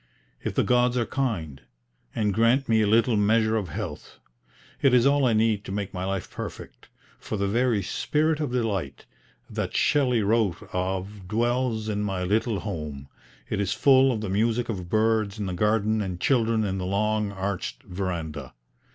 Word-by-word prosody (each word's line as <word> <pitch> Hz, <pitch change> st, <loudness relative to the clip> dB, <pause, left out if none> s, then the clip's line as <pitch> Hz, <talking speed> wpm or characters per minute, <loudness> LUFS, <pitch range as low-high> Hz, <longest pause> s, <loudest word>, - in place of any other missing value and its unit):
If -, -, -3 dB
the -, -, +3 dB
gods 125 Hz, 0 st, +2 dB
are 120 Hz, -, +1 dB
kind 90 Hz, -, -3 dB, 0.5 s
and 105 Hz, -2 st, +1 dB
grant 115 Hz, +6 st, +3 dB
me 110 Hz, -1 st, +3 dB
a 105 Hz, -, +2 dB
little 115 Hz, +2 st, +3 dB
measure 110 Hz, +2 st, +3 dB
of 100 Hz, -6 st, -2 dB
health. -, -, -6 dB, 0.6 s
It 135 Hz, -2 st, +5 dB
is 120 Hz, 0 st, +4 dB
all 140 Hz, -1 st, +4 dB
I 115 Hz, -, +3 dB
need 110 Hz, -1 st, +2 dB
to -, -, -6 dB
make 100 Hz, -1 st, -3 dB
my 90 Hz, -1 st, -3 dB
life 95 Hz, -2 st, -3 dB
perfect, -, -, -8 dB, 0.3 s
for 110 Hz, -, -4 dB
the 100 Hz, 0 st, 0 dB
very 115 Hz, -1 st, +1 dB
'Spirit 155 Hz, -, 0 dB
of 150 Hz, -5 st, -2 dB
Delight' 100 Hz, -, -2 dB, 0.4 s
that -, -, -4 dB
Shelley 125 Hz, -6 st, +2 dB
wrote 105 Hz, -2 st, +1 dB
of 95 Hz, +1 st, -3 dB
dwells 115 Hz, +1 st, 0 dB
in 105 Hz, -1 st, -1 dB
my 95 Hz, -3 st, -2 dB
little 105 Hz, +3 st, 0 dB
home; 75 Hz, -8 st, -6 dB, 0.4 s
it 100 Hz, -, -1 dB
is 100 Hz, -1 st, 0 dB
full 135 Hz, -1 st, +5 dB
of 110 Hz, -4 st, -2 dB
the 105 Hz, -, -3 dB
music 115 Hz, +4 st, +1 dB
of 90 Hz, -5 st, -4 dB
birds 110 Hz, -1 st, +1 dB
in 105 Hz, -, -3 dB
the 95 Hz, -, -3 dB
garden 110 Hz, +3 st, +1 dB
and 90 Hz, -3 st, -4 dB
children 115 Hz, -3 st, +2 dB
in 95 Hz, -2 st, -2 dB
the 90 Hz, -, -3 dB
long 105 Hz, +1 st, 0 dB
arched 95 Hz, -1 st, -4 dB
verandah." 85 Hz, -8 st, -5 dB
105 Hz, 175 wpm, -26 LUFS, 95-115 Hz, 0.6 s, It